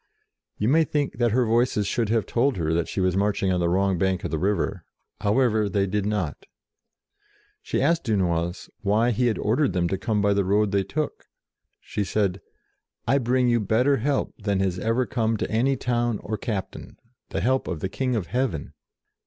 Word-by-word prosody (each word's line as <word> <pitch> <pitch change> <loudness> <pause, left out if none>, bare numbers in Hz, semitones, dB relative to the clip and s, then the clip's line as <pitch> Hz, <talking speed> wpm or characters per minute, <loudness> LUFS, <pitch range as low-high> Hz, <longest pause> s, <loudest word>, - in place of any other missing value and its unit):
You 105 - 0
may 160 +6 +5
think 145 -5 -2
that 120 -1 +3
her 125 +3 +2
Voices 115 -2 +2
should 115 +1 -1
have 115 -1 +1
told 125 -1 +1
her 80 -2 0
that 85 0 0
she - - -4
was 90 -1 +1
marching 100 -1 +1
on 90 - 0
the 85 -1 +1
wrong 95 0 +1
bank 95 -1 0
of - - -3
the 80 - -1
river: 95 0 -1 0.4
however, 110 0 +2
they 100 0 +1
did 100 +1 -1
not 105 -8 -3 1.1
She - - -1
asked 165 +2 +2
Dunois 90 -5 0
why 110 +4 +2
he 125 +2 +1
had 115 - 0
ordered 115 - +1
them 90 -2 +1
to 95 - -2
come 110 0 0
by 100 0 +3
the 100 0 +2
road 100 +2 +2
they 100 -1 +2
took. 150 +10 -4 0.5
She 105 - -3
said, 100 -2 -1 0.7
"I 135 +4 +3
bring 125 0 +2
you 120 -1 +3
better 120 +7 +2
help 140 +4 -1
than 100 -2 0
has 95 -2 0
ever 115 +6 +1
come 115 -3 0
to - - -3
any 125 +5 +2
town 120 -2 0
or 110 - -3
captain, 105 -4 -5 0.3
the - - -2
help 130 +2 +1
of 85 -4 -3
the 95 - -2
King 130 +5 -1
of 105 -6 -1
heaven." 120 - -2
105 Hz, 195 wpm, -25 LUFS, 95-120 Hz, 1.1 s, may